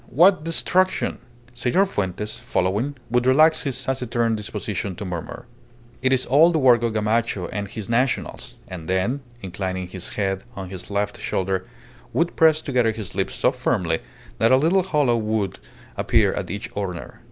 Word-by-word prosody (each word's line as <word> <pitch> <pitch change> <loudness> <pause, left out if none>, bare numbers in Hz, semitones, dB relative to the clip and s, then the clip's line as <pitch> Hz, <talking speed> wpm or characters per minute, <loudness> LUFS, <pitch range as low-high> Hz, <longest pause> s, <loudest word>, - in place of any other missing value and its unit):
What 175 - +5
destruction!" 185 +3 +1 0.3
Senor 125 +11 +2
Fuentes, 105 - -3
following, 105 +10 -1 0.2
would 125 +1 +2
relax 155 +5 +5
his 135 -4 -2
taciturn 120 -3 0
disposition 105 -2 -4
to 105 - -6
murmur 90 -3 -6 0.6
"It 130 0 +2
is 130 -1 +2
all 155 +6 +6
the 165 - +1
work 125 -5 +5
of 115 -2 0
Gamacho 110 -3 0
and 100 0 -3
his 105 0 -7
Nationals;" 125 +3 -1
and 85 -3 -8
then, 95 +9 +1 0.2
inclining 95 0 -3
his 90 -1 -7
head 95 -2 -1
on 95 -2 -6
his 95 0 -8
left 105 0 -1
shoulder, 95 0 -1 0.5
would 170 +1 +1
press 160 -1 +4
together 125 -5 +2
his 110 -3 -7
lips 95 0 -2
so - - +3
firmly 105 -11 0 0.4
that 115 +2 +4
a 130 - +7
little 165 +7 +3
hollow 150 -10 +2
would 110 -3 -1 0.4
appear - - +3
at - - -4
each 100 - -5
corner. 95 -4 -5
115 Hz, 165 wpm, -23 LUFS, 95-135 Hz, 0.6 s, a